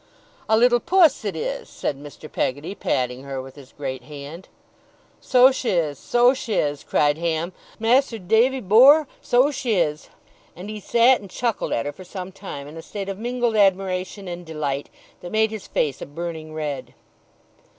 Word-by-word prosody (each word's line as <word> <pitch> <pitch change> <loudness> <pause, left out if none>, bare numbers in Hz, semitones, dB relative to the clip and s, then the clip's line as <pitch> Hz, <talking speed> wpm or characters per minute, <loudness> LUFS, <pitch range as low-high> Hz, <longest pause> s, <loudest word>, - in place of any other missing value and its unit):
'A 220 - +5
little 240 +1 +5
puss, 330 -5 +4
it 205 - -3
is!' - - -4
said - - -3
Mr. 145 +2 -11
Peggotty, 145 +5 -2
patting 125 -8 -1
her 135 -1 -5
with 130 0 -9
his 140 -2 -14
great 130 -3 -5
hand. 145 +5 -10 0.7
'So 255 +1 +5
sh' 260 - -5
is! 160 - 0
so 245 +1 +4
sh' 260 -3 -7
is!' 145 -8 0
cried 145 +1 +1
Ham. 170 +1 -1 0.3
'Mas'r 235 +2 +2
Davy 225 +7 +2
bor', 265 +10 +7
so 255 +4 +3
sh' 265 -2 -6
is!' 165 -9 0 0.5
and 190 +5 -8
he 215 - -6
sat 235 +4 +4
and 200 - -11
chuckled 230 +3 -2
at 115 - 0
her 145 - -2
for 185 - -12
some 185 0 -7
time, 160 -7 -8
in 155 +2 -10
a - - -6
state 200 +3 -6
of 195 0 -5
mingled 240 0 -1
admiration 195 -1 +1
and 175 0 -6
delight, 150 -4 -3 0.3
that 175 - -8
made 220 0 +2
his 220 -3 -7
face 140 -3 -1
a - - -6
burning 160 +1 -6
red. 150 -3 -5
185 Hz, 180 wpm, -23 LUFS, 150-235 Hz, 0.7 s, bor